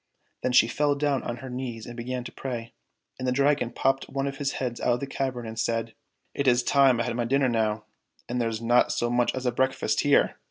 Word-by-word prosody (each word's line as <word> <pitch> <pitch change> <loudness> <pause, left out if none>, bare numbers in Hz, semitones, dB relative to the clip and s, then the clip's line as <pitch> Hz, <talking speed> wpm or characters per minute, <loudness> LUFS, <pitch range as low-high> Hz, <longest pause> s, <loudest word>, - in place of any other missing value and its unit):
Then 130 - 0
she 115 - +6
fell 145 +3 +1
down 140 -2 0
on 120 - -4
her - - -6
knees 125 -3 -5
and 120 - -8
began 125 +1 -4
to - - -8
pray, 115 -3 -6 0.5
and 130 - -3
the - - +2
Dragon 140 -1 +2
popped 135 +2 0
one 135 0 -2
of 140 -1 -4
his 140 -1 -1
heads 125 -3 -3
out 120 - +2
of 120 - -1
the 140 - -3
cavern 130 -3 -3
and 110 0 -6
said, 115 0 -1 0.4
"It 140 - -1
is 125 -1 +4
time 135 -2 +4
I - - +2
had 120 0 -3
my 120 -1 -1
dinner 135 +2 +2
now, 110 -2 0 0.4
and 125 0 -1
there's 115 -1 -2
not 120 +1 +4
so 120 0 0
much 120 0 +2
as 130 0 -4
a 125 - +2
breakfast 130 -4 0
here 145 -1 +3
125 Hz, 240 wpm, -26 LUFS, 115-135 Hz, 0.5 s, she